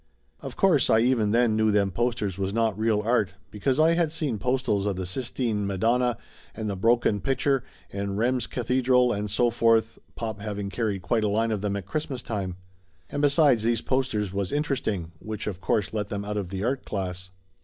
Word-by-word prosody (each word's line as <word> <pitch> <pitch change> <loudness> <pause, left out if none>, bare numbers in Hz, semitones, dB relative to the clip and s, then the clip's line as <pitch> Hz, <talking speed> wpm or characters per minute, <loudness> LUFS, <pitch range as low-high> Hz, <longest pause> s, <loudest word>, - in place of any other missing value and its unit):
Of - - -8
course 175 -9 +3
I 110 - +5
even 120 -3 +2
then 115 0 +3
knew 110 0 +3
them 100 -2 +2
posters 115 -4 -1
was 95 0 -2
not 115 -3 +1
real 110 0 +1
art, 110 -5 +1 0.2
because 130 +7 0
I 160 +1 +5
had 170 -2 +1
seen 150 -9 -2
postals 125 -5 0
of 100 - 0
the 95 0 -4
Sistine 115 0 -2
Ma 100 - -2
donna 120 +3 +2 0.4
and 110 -1 -4
the 100 - -2
Broken 115 0 +2
Pitcher 135 +2 +1 0.3
and 100 0 -3
Rheims 125 +2 +1
Cathedral 125 0 +2
and 105 0 -3
so 120 +4 +2
forth, 115 -1 +2 0.2
pop 110 -3 -4
having 100 -2 -4
carried 100 -4 -2
quite 110 +5 +1
a - - +2
line 110 +2 +1
of 105 -3 -1
them 100 -1 -1
at 100 -3 -4
Christmas 130 +3 -4
time. 95 -5 -3 0.6
And 145 - -2
besides, 145 -5 +4
these 115 0 +1
posters 115 -7 -1
was 100 -1 -2
in 145 +1 +1
teresting, 105 - -2
which 110 -1 -5
of 95 -3 -4
course 105 +2 0
let 105 -2 -2
them 100 0 -4
out 105 0 -3
of 100 -4 -3
the 95 +1 -4
art 130 +3 -1
class. 90 -2 -4
110 Hz, 205 wpm, -26 LUFS, 100-125 Hz, 0.6 s, I